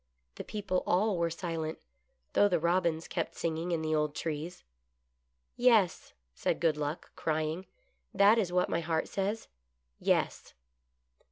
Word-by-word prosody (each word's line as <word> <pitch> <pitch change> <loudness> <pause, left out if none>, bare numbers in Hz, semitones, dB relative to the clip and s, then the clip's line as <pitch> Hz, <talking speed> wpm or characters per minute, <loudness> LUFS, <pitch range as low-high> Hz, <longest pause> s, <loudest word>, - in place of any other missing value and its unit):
The - - -7
people 195 -3 -2
all 200 +3 +3
were 170 0 +2
silent, 165 -2 -3 0.6
though 205 - +5
the 180 -3 +2
robins 170 -1 +1
kept - - -3
singing 165 +1 -2
in 165 -2 0
the 155 0 0
old 150 -1 +1
trees. 160 +2 -4 0.9
"Yes," 230 -7 +3 0.2
said - - -1
Good 165 -3 +3
Luck, 150 +2 -4
crying; 160 +3 -1 0.4
"that 205 +3 +5
is 190 -5 0
what 180 0 +2
my 165 - 0
heart 160 -1 -1
says 205 +3 -2 0.3
— 60 0 -49
yes." - - 0
170 Hz, 145 wpm, -31 LUFS, 160-190 Hz, 0.9 s, though